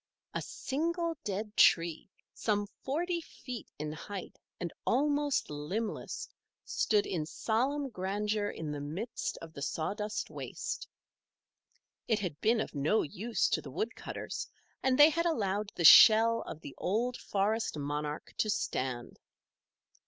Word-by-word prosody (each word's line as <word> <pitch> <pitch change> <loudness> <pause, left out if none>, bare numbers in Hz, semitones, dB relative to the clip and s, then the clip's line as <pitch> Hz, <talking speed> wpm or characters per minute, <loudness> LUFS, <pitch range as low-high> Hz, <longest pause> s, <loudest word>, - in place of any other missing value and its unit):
A - - -2
single 335 +4 -2
dead 210 +2 -3
tree, 165 +1 +4 0.2
some 205 -2 0 0.2
forty 340 +5 -1
feet 250 -7 -8
in 150 0 -3
height 180 +5 -7 0.2
and 175 -2 -4
almost 290 - +1
limbless, 200 - -3 0.4
stood 210 -2 +2
in 160 -5 -2
solemn 265 - 0
grandeur 205 +2 -1
in 155 -5 -5
the 145 -1 -4
midst 175 +11 -4
of 160 -1 -10
the 140 - -8
sawdust 210 +9 -2
waste. - - -5 1.2
It 220 - +3
had 180 -8 -4
been 225 +1 +3
of - - -5
no 150 +9 +2
use 220 +10 0
to - - +1
the - - -9
woodcutters 430 - -4 0.3
and 260 -1 +2
they 295 +2 +9
had 335 +2 +1
allowed 205 - 0
the 170 - 0
shell 230 +5 +9
of 160 -1 -7
the 140 - -8
old 235 +6 0
forest 210 -2 -1
monarch 150 +1 -3
to 215 - +2
stand. 130 - -2
210 Hz, 135 wpm, -32 LUFS, 165-245 Hz, 1.2 s, they